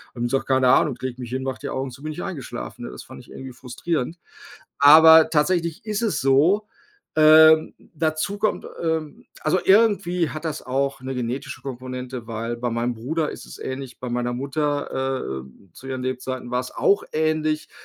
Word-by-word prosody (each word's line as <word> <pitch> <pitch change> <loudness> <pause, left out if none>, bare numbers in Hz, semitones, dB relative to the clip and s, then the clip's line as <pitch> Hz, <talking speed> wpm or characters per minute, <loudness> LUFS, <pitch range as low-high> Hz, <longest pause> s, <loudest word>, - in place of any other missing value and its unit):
die - - -9
haben - - -1
gesagt: 135 +3 -1
„Keine 130 -1 +3
Ahnung, 145 +2 +4
ich - - -21
lege 130 -1 -4
mich 120 -1 -7
hin, 130 +1 -2
mache 135 -1 -4
die - - -4
Augen 135 0 -3
zu, 135 +3 -13
bin 155 - -4
ich 175 - -7
eingeschlafen.“ 135 - -6
Ne, - - -7
das 60 - -9
fand - - -12
ich - - -18
irgendwie 130 -1 -9
frustrierend. 130 +6 -4 0.6
Aber 160 +2 +8
tatsächlich 165 +3 0
ist 210 0 -2
es 225 -4 0
so. 150 +11 +3 0.5
Ähm, 155 0 +7 0.2
dazu 155 +5 -1
kommt 215 - -1 0.2
ähm, 160 -2 -3 0.2
also 155 +4 +2
irgendwie 190 -5 +3
hat 155 - -7
das 155 -2 -3
auch 135 +2 -1
'ne 130 0 -5
genetische 125 +3 -4
Komponente, 125 -2 -7
weil 115 +1 -4
bei 120 +1 -2
meinem 120 +1 -1
Bruder 150 +8 -2
ist - - -9
es - - -11
ähnlich, 130 -1 -6
bei 125 - -4
meiner 120 0 -1
Mutter, 135 - -2
äh, 90 +8 -22
zu 135 - -12
ihren 130 -1 -4
Lebzeiten 130 -1 -4
war's 125 +1 -2
auch 200 - +2
ähnlich. 155 0 0
135 Hz, 190 wpm, -23 LUFS, 125-160 Hz, 0.6 s, Aber